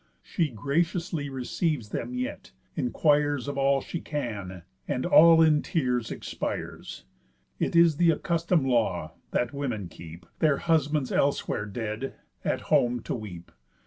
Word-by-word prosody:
She 165 Hz, -5 st, -1 dB
graciously 160 Hz, -, -1 dB
receives 135 Hz, -, -2 dB
them 120 Hz, +3 st, -4 dB
yet, 125 Hz, -, -5 dB, 0.2 s
inquires 145 Hz, +1 st, +1 dB
Of 145 Hz, -, -3 dB
all 135 Hz, 0 st, +2 dB
she 170 Hz, -, -5 dB
can, 100 Hz, -, -5 dB, 0.2 s
and 125 Hz, -, -1 dB
all 165 Hz, -1 st, +7 dB
in 155 Hz, -2 st, +4 dB
tears 125 Hz, -8 st, -1 dB
expires. -, -, -5 dB, 0.5 s
It -, -, -1 dB
is 170 Hz, -3 st, +5 dB
th' 170 Hz, 0 st, +4 dB
accustom'd 165 Hz, -1 st, +1 dB
law, 110 Hz, -10 st, +1 dB, 0.2 s
that 120 Hz, +1 st, -1 dB
women 120 Hz, -10 st, -3 dB
keep, 85 Hz, +1 st, -11 dB
Their 150 Hz, -3 st, +3 dB
husbands 150 Hz, -4 st, +1 dB
elsewhere 140 Hz, -6 st, 0 dB
dead, 110 Hz, +4 st, -4 dB, 0.3 s
at -, -, -1 dB
home 120 Hz, 0 st, +2 dB
to -, -, -4 dB
weep. 95 Hz, -7 st, -7 dB
135 Hz, 135 wpm, -27 LUFS, 115-155 Hz, 0.5 s, all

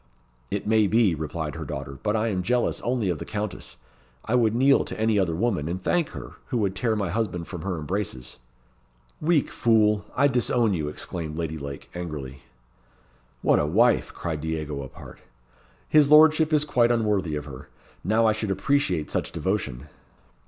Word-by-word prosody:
"It -, -, -3 dB
may 110 Hz, -1 st, +3 dB
be," 110 Hz, -3 st, +3 dB
replied 80 Hz, 0 st, -4 dB
her -, -, -6 dB
daughter, 70 Hz, 0 st, -6 dB
"but 105 Hz, 0 st, 0 dB
I 110 Hz, +1 st, +1 dB
am 95 Hz, -3 st, -1 dB
jealous 120 Hz, +5 st, 0 dB
only 120 Hz, -4 st, -1 dB
of 85 Hz, -4 st, -2 dB
the -, -, -4 dB
Countess. 105 Hz, -2 st, -5 dB, 0.5 s
I 115 Hz, -, -2 dB
would 115 Hz, -3 st, +3 dB
kneel 135 Hz, +3 st, +4 dB
to -, -, -7 dB
any 110 Hz, -1 st, +2 dB
other 85 Hz, -4 st, 0 dB
woman, 95 Hz, -6 st, 0 dB
and 90 Hz, +2 st, -3 dB
thank 170 Hz, -, 0 dB
her, -, -, -8 dB, 0.2 s
who 125 Hz, -, -1 dB
would 100 Hz, -4 st, 0 dB
tear 110 Hz, +2 st, 0 dB
my 100 Hz, -4 st, -2 dB
husband 95 Hz, -5 st, -2 dB
from 90 Hz, -4 st, -7 dB
her 95 Hz, -1 st, -3 dB
embraces!" 75 Hz, -7 st, -4 dB, 0.8 s
"Weak 155 Hz, -2 st, +2 dB
fool! 105 Hz, -3 st, +3 dB
I 140 Hz, +2 st, +4 dB
disown 120 Hz, -4 st, +1 dB
you," 80 Hz, -4 st, -2 dB
exclaimed 80 Hz, 0 st, -5 dB
Lady 80 Hz, -2 st, -3 dB
Lake, 70 Hz, -1 st, -8 dB
angrily. 75 Hz, -6 st, -6 dB, 1.0 s
"What -, -, +4 dB
a 75 Hz, -, +1 dB
wife!" 115 Hz, +9 st, +3 dB
cried 80 Hz, -3 st, -4 dB
Diego, 75 Hz, -3 st, -3 dB
apart. 65 Hz, -, -11 dB, 0.7 s
"His 150 Hz, -2 st, +5 dB
lordship 155 Hz, +1 st, +6 dB
is 150 Hz, -1 st, +3 dB
quite 120 Hz, -5 st, +3 dB
unworthy 105 Hz, -9 st, 0 dB
of 75 Hz, -1 st, -4 dB
her. 65 Hz, -1 st, -10 dB, 0.3 s
Now 110 Hz, +5 st, +2 dB
I 110 Hz, -, +4 dB
should 110 Hz, -1 st, -4 dB
appreciate 95 Hz, -, 0 dB
such -, -, -2 dB
devotion." 75 Hz, -9 st, -3 dB
100 Hz, 175 wpm, -25 LUFS, 80-115 Hz, 1.0 s, lordship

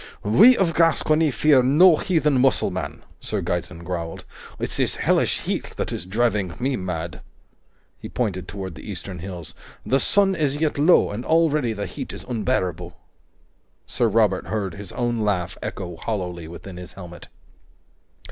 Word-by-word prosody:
"We 210 Hz, -, +7 dB
of 175 Hz, -4 st, +2 dB
Gascony 160 Hz, -1 st, +3 dB
fear 145 Hz, 0 st, +4 dB
no 155 Hz, +7 st, +6 dB
heathen 150 Hz, -7 st, +1 dB
Musselman," 135 Hz, 0 st, 0 dB, 0.2 s
Sir 105 Hz, -, -3 dB
Gaeton 90 Hz, -1 st, -3 dB
growled. 85 Hz, -2 st, -5 dB, 0.3 s
"It's -, -, -3 dB
this -, -, 0 dB
Hellish -, -, +1 dB
heat -, -, -4 dB
that -, -, -3 dB
is 90 Hz, -, -5 dB
driving 105 Hz, -4 st, 0 dB
me 130 Hz, +2 st, 0 dB
mad." 85 Hz, -5 st, -4 dB, 0.8 s
He -, -, -8 dB
pointed 95 Hz, -7 st, -2 dB
toward 95 Hz, -3 st, -6 dB
the 75 Hz, -, -11 dB
eastern 95 Hz, -1 st, -6 dB
hills. 90 Hz, -2 st, -7 dB, 0.3 s
"The 135 Hz, -, +2 dB
sun 195 Hz, +7 st, +3 dB
is 145 Hz, -5 st, 0 dB
yet 150 Hz, -2 st, 0 dB
low, 155 Hz, -, +5 dB
and 105 Hz, +4 st, -5 dB
already 150 Hz, -7 st, +2 dB
the 100 Hz, -1 st, -4 dB
heat -, -, -7 dB
is -, -, -8 dB
unbearable." 90 Hz, -8 st, -2 dB, 0.9 s
Sir 120 Hz, -, 0 dB
Robert 105 Hz, -3 st, +2 dB
heard 100 Hz, -5 st, -2 dB
his 100 Hz, 0 st, -9 dB
own 120 Hz, -2 st, -1 dB
laugh 95 Hz, -5 st, -1 dB
echo 90 Hz, -3 st, -5 dB
hollowly 90 Hz, -5 st, -4 dB
within 90 Hz, +2 st, -9 dB
his 90 Hz, 0 st, -10 dB
helmet. 90 Hz, -3 st, -11 dB
105 Hz, 155 wpm, -23 LUFS, 90-140 Hz, 0.9 s, We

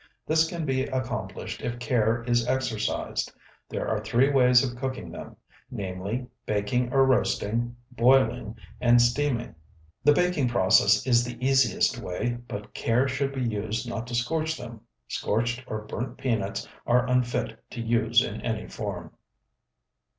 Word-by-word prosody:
This 160 Hz, +1 st, +3 dB
can 170 Hz, -2 st, -4 dB
be 130 Hz, -2 st, 0 dB
accomplished 130 Hz, -2 st, -4 dB
if 120 Hz, 0 st, -3 dB
care 120 Hz, -1 st, +1 dB
is 120 Hz, -1 st, +1 dB
exercised. 125 Hz, -4 st, -1 dB, 0.4 s
There -, -, -3 dB
are 105 Hz, -1 st, -1 dB
three 120 Hz, +6 st, +3 dB
ways 125 Hz, -2 st, +5 dB
of 120 Hz, -2 st, -3 dB
cooking 130 Hz, -9 st, -4 dB
them: -, -, -9 dB, 0.3 s
namely, 100 Hz, +1 st, -4 dB, 0.2 s
baking 110 Hz, +4 st, 0 dB
or 135 Hz, 0 st, +5 dB
roasting, 120 Hz, -2 st, +1 dB, 0.2 s
boiling, 125 Hz, -2 st, +3 dB, 0.2 s
and 120 Hz, 0 st, +5 dB
steaming. 120 Hz, 0 st, +1 dB, 0.5 s
The 145 Hz, +2 st, +6 dB
baking 180 Hz, -5 st, +2 dB
process 100 Hz, -1 st, +4 dB
is 120 Hz, -2 st, +4 dB
the 120 Hz, 0 st, -6 dB
easiest 130 Hz, -3 st, +2 dB
way, 120 Hz, +7 st, -3 dB
but 105 Hz, 0 st, -7 dB
care 120 Hz, +4 st, +1 dB
should 135 Hz, +1 st, -1 dB
be 135 Hz, -2 st, -3 dB
used 110 Hz, +1 st, -2 dB
not 115 Hz, 0 st, -4 dB
to 120 Hz, -, -4 dB
scorch 160 Hz, +6 st, 0 dB
them. 120 Hz, -3 st, -9 dB, 0.3 s
Scorched 120 Hz, +4 st, -1 dB
or 110 Hz, 0 st, -4 dB
burnt 120 Hz, +4 st, -5 dB
peanuts 110 Hz, -6 st, -2 dB, 0.2 s
are 125 Hz, +1 st, +3 dB
unfit 125 Hz, -1 st, 0 dB
to -, -, -8 dB
use 115 Hz, 0 st, +3 dB
in 105 Hz, -, -5 dB
any 110 Hz, -2 st, -3 dB
form. 90 Hz, -6 st, -6 dB
120 Hz, 145 wpm, -26 LUFS, 110-130 Hz, 0.5 s, The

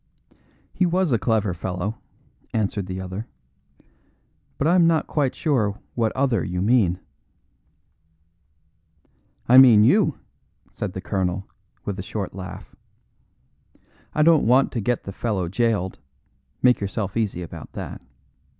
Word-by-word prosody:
"He 180 Hz, -, +2 dB
was 180 Hz, -2 st, +1 dB
a 115 Hz, -, +2 dB
clever 110 Hz, -5 st, +1 dB
fellow," 90 Hz, +5 st, -4 dB, 0.6 s
answered 100 Hz, -3 st, -1 dB
the 95 Hz, 0 st, -5 dB
other, 95 Hz, +4 st, -6 dB, 1.3 s
"but 140 Hz, -, -1 dB
I 165 Hz, -, +4 dB
am 175 Hz, -2 st, +5 dB
not 165 Hz, -2 st, +2 dB
quite 140 Hz, -4 st, -1 dB
sure 135 Hz, -9 st, +1 dB
of 100 Hz, +2 st, -6 dB
what 115 Hz, -2 st, 0 dB
other 130 Hz, -9 st, +1 dB
you 90 Hz, 0 st, -3 dB
mean." 100 Hz, -4 st, +2 dB, 2.5 s
"I 125 Hz, +2 st, +8 dB
mean 115 Hz, -5 st, +8 dB
you," 155 Hz, -, +3 dB, 0.5 s
said 100 Hz, -3 st, -5 dB
the 95 Hz, -, -5 dB
colonel, 95 Hz, 0 st, -2 dB, 0.4 s
with 100 Hz, -1 st, -4 dB
a -, -, -2 dB
short 95 Hz, 0 st, -5 dB
laugh. 90 Hz, -1 st, -9 dB, 1.4 s
"I 150 Hz, -, +3 dB
don't 160 Hz, -6 st, +5 dB
want 130 Hz, +3 st, +4 dB
to 115 Hz, -, -2 dB
get 120 Hz, +3 st, -1 dB
the 100 Hz, -, -7 dB
fellow 100 Hz, -5 st, -2 dB
jailed; 100 Hz, -1 st, -1 dB, 0.6 s
make 125 Hz, -1 st, +5 dB
yourself 100 Hz, 0 st, -3 dB
easy 105 Hz, -6 st, -1 dB
about 85 Hz, -, -10 dB
that. -, -, -7 dB
110 Hz, 135 wpm, -23 LUFS, 95-130 Hz, 2.5 s, I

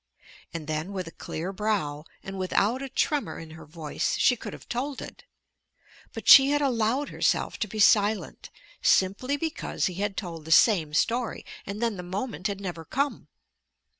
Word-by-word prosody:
And 165 Hz, -2 st, -6 dB
then 155 Hz, +5 st, -3 dB
with 185 Hz, -2 st, -3 dB
a -, -, -8 dB
clear 175 Hz, +5 st, -5 dB
brow 185 Hz, -8 st, -1 dB, 0.2 s
and 195 Hz, 0 st, -6 dB
without 205 Hz, +6 st, +1 dB
a 275 Hz, -, -5 dB
tremor 290 Hz, +2 st, -1 dB
in 160 Hz, -1 st, -9 dB
her 160 Hz, -1 st, -12 dB
voice 155 Hz, -1 st, -2 dB
she 250 Hz, -, +4 dB
could -, -, -7 dB
have -, -, -12 dB
told 265 Hz, +3 st, -3 dB
it. -, -, -10 dB, 0.9 s
But -, -, -8 dB
she 270 Hz, 0 st, +10 dB
had 290 Hz, 0 st, +2 dB
allowed 255 Hz, 0 st, +1 dB
herself -, -, 0 dB
to 215 Hz, -, -1 dB
be 215 Hz, -, -8 dB
silent, 210 Hz, 0 st, +3 dB, 0.3 s
simply 200 Hz, +9 st, +2 dB
because 320 Hz, +2 st, -2 dB
he 185 Hz, -, -1 dB
had 205 Hz, -1 st, -2 dB
told 165 Hz, -4 st, -5 dB
the 160 Hz, -, -6 dB
same 160 Hz, -5 st, +5 dB
story, 235 Hz, +7 st, 0 dB, 0.2 s
and 205 Hz, +3 st, -4 dB
then 230 Hz, -4 st, 0 dB
the -, -, -5 dB
moment 185 Hz, +2 st, -3 dB
had 200 Hz, -1 st, -4 dB
never 175 Hz, -4 st, -5 dB
come. 270 Hz, -, -2 dB
200 Hz, 175 wpm, -27 LUFS, 170-245 Hz, 0.9 s, she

